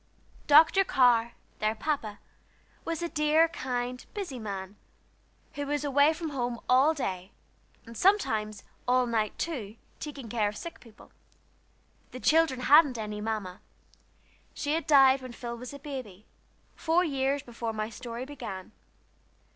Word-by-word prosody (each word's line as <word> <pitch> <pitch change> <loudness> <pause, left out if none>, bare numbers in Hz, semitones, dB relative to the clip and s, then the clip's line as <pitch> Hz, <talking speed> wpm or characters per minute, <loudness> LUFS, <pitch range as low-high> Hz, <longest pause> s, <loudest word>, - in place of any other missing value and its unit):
Dr. 320 +6 +7
Carr, 245 -8 +3 0.3
their 215 +1 0
Papa, 225 -6 -3 0.7
was 330 0 -3
a - - 0
dear, 310 +1 +3
kind, 250 -5 -4
busy 355 -12 -5
man, 195 -2 -6 0.8
who 285 -1 -4
was 290 +1 -1
away 285 +1 +4
from 320 0 -4
home 245 -4 -3
all 270 +5 +4
day, 190 -8 -4 0.5
and 230 0 -11
sometimes 220 - +1 0.2
all 250 0 +3
night, 225 -3 -1
too, 235 -11 -4 0.2
taking 280 -5 -7
care 215 -2 0
of 210 - -9
sick 340 - -8
people. 230 -2 -17 1.0
The 255 - -7
children 310 -3 +3
hadn't 285 -1 +6
any 210 -1 -5
Mamma. 210 -4 -4 0.9
She 290 0 -2
had 325 -2 -2
died 270 -2 +6
when 255 -1 -8
Phil 235 0 -6
was 245 +1 -8
a 285 - -8
baby, 255 -9 -8 0.5
four 340 +2 +2
years 275 -3 -1
before 235 -1 -5
my 215 0 -4
story 240 +1 -6
began. 210 -10 -8
255 Hz, 140 wpm, -28 LUFS, 220-295 Hz, 1.0 s, Dr